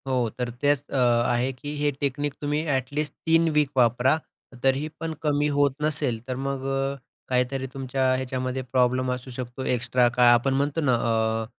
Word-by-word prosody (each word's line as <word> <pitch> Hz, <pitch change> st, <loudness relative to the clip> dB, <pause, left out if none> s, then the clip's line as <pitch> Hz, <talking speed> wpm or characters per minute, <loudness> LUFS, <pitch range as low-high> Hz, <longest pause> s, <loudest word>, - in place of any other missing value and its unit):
हो 135 Hz, -, -1 dB, 0.2 s
तर 125 Hz, -1 st, -2 dB
तेच 145 Hz, -1 st, +2 dB
अ, -, -, -2 dB
आहे 120 Hz, +1 st, +2 dB
की 145 Hz, +4 st, -6 dB
हे 145 Hz, 0 st, +1 dB
टेक्निक 145 Hz, +1 st, -1 dB
तुम्ही 150 Hz, +1 st, -1 dB
ॲट 135 Hz, -4 st, 0 dB
लिस्ट 150 Hz, -1 st, -2 dB
3 165 Hz, 0 st, +4 dB
वीक 150 Hz, -2 st, +3 dB
वापरा. 125 Hz, +4 st, +4 dB, 0.5 s
तरी 135 Hz, 0 st, +3 dB
ही 150 Hz, -, -3 dB
पण 165 Hz, 0 st, -3 dB
कमी 145 Hz, -1 st, +2 dB
होत 140 Hz, -2 st, +3 dB
नसेल 145 Hz, -6 st, -1 dB
तर 130 Hz, -, -2 dB
मग 135 Hz, +1 st, -3 dB
अ, 135 Hz, 0 st, -1 dB, 0.3 s
काहीतरी 130 Hz, +1 st, 0 dB
तुमच्या 135 Hz, 0 st, -2 dB
ह्याच्यामध्ये 130 Hz, 0 st, -3 dB
प्रॉब्लेम 130 Hz, 0 st, +1 dB
असू 125 Hz, +1 st, -5 dB
शकतो, 125 Hz, +1 st, -6 dB
एक्स्ट्रा 125 Hz, 0 st, +2 dB
काय 120 Hz, -1 st, +7 dB
आपण 120 Hz, +3 st, +2 dB
म्हणतो 145 Hz, +4 st, 0 dB
ना 135 Hz, -4 st, +2 dB
अ, 115 Hz, -1 st, +1 dB
130 Hz, 180 wpm, -25 LUFS, 125-145 Hz, 0.5 s, काय